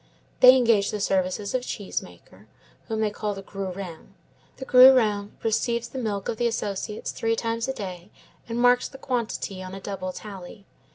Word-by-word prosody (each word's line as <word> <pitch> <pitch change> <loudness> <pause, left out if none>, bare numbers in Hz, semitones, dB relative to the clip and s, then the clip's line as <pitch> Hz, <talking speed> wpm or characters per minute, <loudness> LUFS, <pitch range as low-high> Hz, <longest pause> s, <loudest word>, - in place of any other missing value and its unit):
'They 255 0 +9
engage 230 -5 +3
the 210 - -3
services 195 +1 -1
of 255 - +1
a - - -13
cheese 205 -5 -4
maker, 95 +4 -16 0.4
whom 220 -1 -2
they 215 -1 +1
call 210 0 -3
the 195 - -8
grurin; 190 -4 -7 0.4
the 265 - -7
grurin 250 -6 +6
receives 235 +1 0
the 265 - -6
milk 205 -5 -3
of 225 - -2
the 240 - +1
associates 210 -1 -3
three 225 0 -1
times 230 +1 -2
a 265 - -1
day, 185 -4 -7 0.4
and 230 - -3
marks 245 0 +4
the 270 - -12
quantity 230 -7 -3
on 185 +1 -7
a - - -7
double 190 -1 -5
tally. 195 0 -10
210 Hz, 180 wpm, -25 LUFS, 195-235 Hz, 0.4 s, They